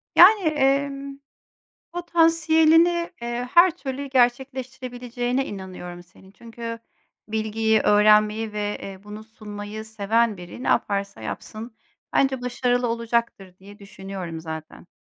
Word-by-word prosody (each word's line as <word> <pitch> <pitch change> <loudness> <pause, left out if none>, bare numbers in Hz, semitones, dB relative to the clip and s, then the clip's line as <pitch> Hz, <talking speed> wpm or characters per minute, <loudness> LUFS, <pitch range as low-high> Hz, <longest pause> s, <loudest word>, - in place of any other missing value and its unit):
Yani, 405 +4 +8
emm, 275 -1 0 0.8
potansiyelini, 330 0 +3
eee, 240 +1 -3
her 345 0 +6
türlü 270 0 -5
gerçekleştirebileceğine 250 0 -1
inanıyorum 185 -4 -8
senin. 185 +2 -20
Çünkü 230 +2 -8 0.5
bilgiyi, 220 0 +1
öğrenmeyi 210 +1 +4
ve, 210 0 -2
eee, 195 -1 -8
bunu 210 +1 -9
sunmayı 215 -1 -8
seven 220 +1 0
biri 175 +7 -9
ne - - -3
yaparsa 200 - 0
yapsın, 215 - -7 0.4
bence 265 -2 +2
başarılı 245 0 0
olacaktır 230 -5 -2
diye 200 +2 -14
düşünüyorum 190 -4 -7
zaten. 160 +1 -8
230 Hz, 110 wpm, -24 LUFS, 205-265 Hz, 0.8 s, Yani